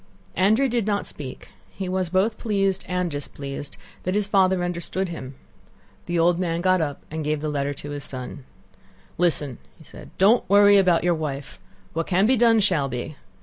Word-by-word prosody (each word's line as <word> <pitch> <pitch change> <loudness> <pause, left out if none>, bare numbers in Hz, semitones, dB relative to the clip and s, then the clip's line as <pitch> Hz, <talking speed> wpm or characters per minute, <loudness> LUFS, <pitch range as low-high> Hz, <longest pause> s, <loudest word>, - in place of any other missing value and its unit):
Andrew 220 +8 +3
did 235 -4 -1
not 205 -1 0
speak; 135 -3 -9 0.2
he 190 - -6
was 185 -1 -1
both 195 +5 +1
pleased 195 -3 0
and 180 -2 -1
displeased 140 0 -6 0.2
that 185 +2 -2
his 210 -1 +1
father 190 -2 +3
understood 175 +2 -2
him. 135 -5 -7 0.7
The 175 0 -1
old 170 +1 +3
man 170 -2 -1
got 185 -1 +3
up 145 -3 -3
and 160 0 -3
gave 150 0 -1
the 155 +1 -3
letter 145 -1 -2
to 145 +1 -7
his 145 -1 -5
son. 130 +1 -7 0.8
"Listen!" 150 -7 +1 0.2
said - - -12
he; - - -18
"don't 210 +6 +4
worry 205 0 +7
about 180 -4 +3
your 175 0 +3
wife: 140 - -5 0.3
what 165 +1 -2
can 190 +2 +3
be 260 +4 +4
done 230 -1 +4
shall 175 -9 +2
be. 125 +4 -5
175 Hz, 185 wpm, -24 LUFS, 145-195 Hz, 0.8 s, worry